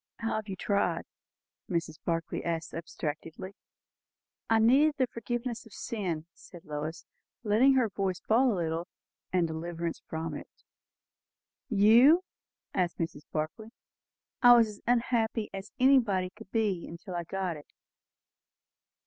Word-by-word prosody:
"How 225 -1 -2
have 215 -1 -5
you 195 - -4
tried?" 200 +2 0 0.7
Mrs. 165 -3 -2
Barclay 165 -1 -2
asked 165 -1 -3
abstractedly. 165 +2 -5 1.0
"I 225 - +5
needed 270 +7 +5
the 260 - +3
forgiveness 235 0 -4
of 215 - -17
sin," 180 -8 -3
said 180 -2 -14
Lois, 155 +1 -5 0.4
letting 240 +6 +5
her 255 -3 +4
voice 195 -3 -2
fall 240 +7 +3
a - - 0
little, 165 0 -2 0.4
"and 180 -2 +2
deliverance 165 +1 -4
from 160 0 -4
it." - - -7 1.2
"You!" 235 - +6 0.5
said 180 -2 +2
Mrs. 160 -3 -4
Barclay. 155 +8 -3 0.7
"I 245 -1 +9
was 230 -1 +5
as 210 - -11
unhappy 230 -2 +1
as 195 +2 -7
anybody 230 -9 +4
could 215 0 -14
be 205 -7 -1
till 185 0 -8
I 175 -1 -2
got 185 0 -3
it." 150 - -13
195 Hz, 130 wpm, -30 LUFS, 165-230 Hz, 1.2 s, I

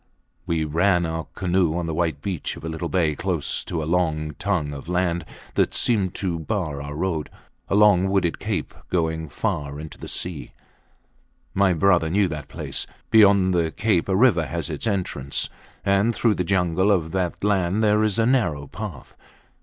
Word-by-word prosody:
We 80 -2 +1
ran 85 +3 +2
our 80 0 -3
canoe 90 -3 +1
on 85 - -2
the 80 - -3
white 80 -4 -1
beach 95 -6 -3
of - - -11
a - - -4
little 80 +1 -4
bay 85 -5 +2
close 85 -4 -2
to 80 -3 -3
a - - -3
long 80 -2 0
tongue 85 -8 -1
of 70 +4 -8
land 90 -2 0 0.3
that - - +1
seemed 100 -7 +2
to 90 -4 -2
bar 80 -5 -2
our 75 0 -6
road; 80 -2 -2 0.4
a - - +1
long 100 -3 +5
wooded 95 -4 +1
cape - - -3 0.2
going 80 -2 -1
far 70 +2 -3
into 80 0 -9
the - - -8
sea. 85 -4 -5 1.0
My 95 -1 +3
brother 85 -1 +3
knew 100 +3 +3
that 75 -3 -6
place. - - -4 0.2
Beyond 100 -4 +6
the 85 -2 +2
cape 100 0 0
a 95 - +2
river 95 -7 +4
has 85 -1 -3
its 75 +9 -4
entrance, 90 -9 -2 0.3
and 100 +4 +2
through 110 +1 +3
the 90 - -1
jungle 95 +1 +2
of 80 -5 +1
that 90 -1 -2
land 100 0 +1
there 105 0 +4
is 105 -3 +1
a 115 - +3
narrow 95 - +1
path. 85 - -8
90 Hz, 180 wpm, -23 LUFS, 80-100 Hz, 1.0 s, Beyond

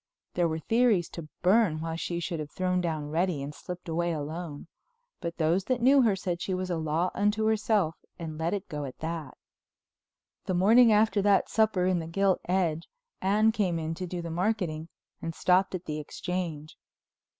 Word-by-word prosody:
There 175 -1 +2
were 160 -1 -2
theories 220 +1 +2
to 160 -3 -8
burn 185 -4 +4
why 160 0 -3
she 170 +1 -3
should 170 -1 -3
have 150 -1 -5
thrown 180 +1 0
down 155 -4 -3
Reddy 165 -3 0
and 145 +2 -6
slipped 180 +3 -8
away 170 +1 0
alone, 155 0 -5 0.5
but 170 -1 -5
those 170 +4 +1
that 255 +1 0
knew 270 +3 +6
her 220 -5 +3
said 175 -2 -3
she 190 - -1
was 185 0 -3
a - - +1
law 160 +2 0
unto 210 +1 +1
herself 215 -6 +1 0.2
and 160 -3 -6
let 165 +4 0
it 200 0 -6
go 150 -1 -4
at 130 - -8
that. 160 -2 -5 1.1
The 185 - -1
morning 225 +6 +6
after 210 -1 +3
that 200 -1 +3
supper 215 -5 +2
in 185 -1 +2
the 160 - -5
Gilt 195 +2 +1
Edge, 170 -3 0 0.3
Anne 210 +3 +3
came 195 -6 0
in 160 0 -3
to 180 +2 -5
do 175 0 -5
the 170 - -5
marketing 175 -4 -1 0.3
and 165 -1 -4
stopped 185 +1 +2
at 180 0 -6
the 155 -1 -3
Exchange. 160 -1 -4
180 Hz, 190 wpm, -28 LUFS, 160-195 Hz, 1.1 s, knew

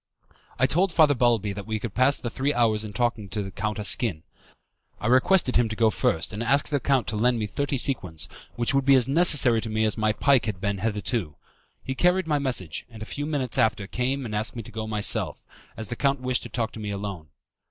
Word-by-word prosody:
I 130 - +3
told 180 +7 +1
Father 155 -3 +5
Balbi 115 -5 +1
that 100 +1 -8
we 110 -1 -1
could 105 -1 -6
pass 130 +3 +3
the 120 - -5
three 140 +4 -1
hours 110 -3 +2
in 105 - -7
talking 120 -2 -2
to 100 0 -3
Count 105 +2 -3
Asquin. 105 -5 +1 0.8
I - - -7
requested 130 - +3
him 120 -2 +2
to 110 - -4
go 110 -1 +3
first 80 -1 0
and 105 - -4
ask 140 +5 +1
the 145 - 0
count 135 -1 +1
to 110 - -3
lend 120 +3 +2
me 110 - -2
thirty 140 +6 -2
sequins, 90 - -1 0.3
which 120 +3 0
would 135 0 +2
be 135 0 +5
as 130 -2 +3
necessary 140 -6 +5
to 115 - -5
me 110 0 0
as 110 +1 -1
my 110 0 +2
pike 125 +3 +2
had 100 -4 -3
been 100 0 -2
hitherto. 105 - -2 0.5
He 130 - -3
carried 180 +5 +2
my 150 -2 0
message, 125 - -3
and 110 -2 -10
a - - -6
few 145 +6 -5
minutes 140 -6 -2
after 105 -2 +1
came 130 +5 -2
and 110 - -6
asked 110 +3 -2
me 115 - -5
to - - -12
go 110 0 -5
myself, 105 -1 -1 0.3
as 110 - -6
the 120 - -3
count 140 +2 +1
wished 130 -1 -1
to 120 - -9
talk 115 0 -2
to - - -10
me 105 -1 -5
alone. 100 -5 -5
115 Hz, 235 wpm, -25 LUFS, 105-135 Hz, 0.8 s, Father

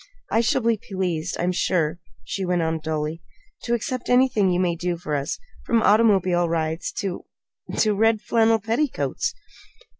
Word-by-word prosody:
I 225 - +3
shall 240 +2 +1
be 230 -1 +2
pleased, 180 -4 -3
I'm 175 +1 +1
sure," 170 -2 0 0.2
she 195 - -4
went 180 -2 +1
on 160 0 -1
dully, 155 +1 -3 0.4
"to 235 - +1
accept 250 +2 -4
anything 245 -6 +4
you 180 0 +1
may 175 -2 +1
do 175 0 -2
for 155 -3 -5
us, 140 -1 -1 0.3
from 230 -1 +2
automobile 190 -5 +4
rides 160 0 -1
to 190 -3 -4 0.5
to 215 -1 +3
red 220 +2 +3
flannel 225 +1 +3
petticoats." 230 +7 -1
185 Hz, 155 wpm, -23 LUFS, 170-225 Hz, 0.5 s, anything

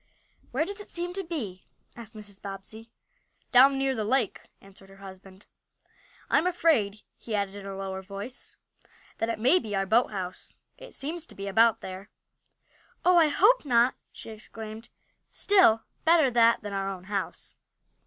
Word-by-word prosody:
"Where 275 +6 0
does 405 +3 -6
it 415 - -9
seem 350 +1 -4
to 390 - -2
be?" 235 - -6 0.3
asked 230 -1 -11
Mrs. 205 -2 -10
Bobbsey. 205 +3 -9 0.6
"Down 270 +2 +7
near 270 0 +1
the 220 -4 -2
lake," 235 0 0 0.2
answered 195 0 -16
her 195 - -16
husband. 190 0 -13 0.8
"I'm 355 - +3
afraid, 270 - +1 0.2
he 225 - -4
added 200 -1 -2
in 200 -1 -8
a 195 - -6
lower 190 0 -5
voice, 200 +6 -8 0.6
that 225 - 0
it 230 - -1
may 260 +12 +4
be 210 -3 -5
our 195 0 0
boathouse. 195 -4 -1 0.2
It - - -13
seems 325 +4 -4
to - - -14
be 200 0 -6
about 225 +3 +4
there." 190 +2 -8 1.0
"Oh, 360 0 +6
I 325 -2 +6
hope 420 +11 +4
not!" 245 -2 +3 0.2
she - - -10
exclaimed. 220 +1 -9 0.4
"Still, 360 - +4 0.2
better 320 -5 +4
that 230 -1 +4
than 205 -1 -5
our 195 0 -2
own 190 -2 -7
house." 200 0 -5
220 Hz, 165 wpm, -27 LUFS, 195-270 Hz, 1.0 s, Down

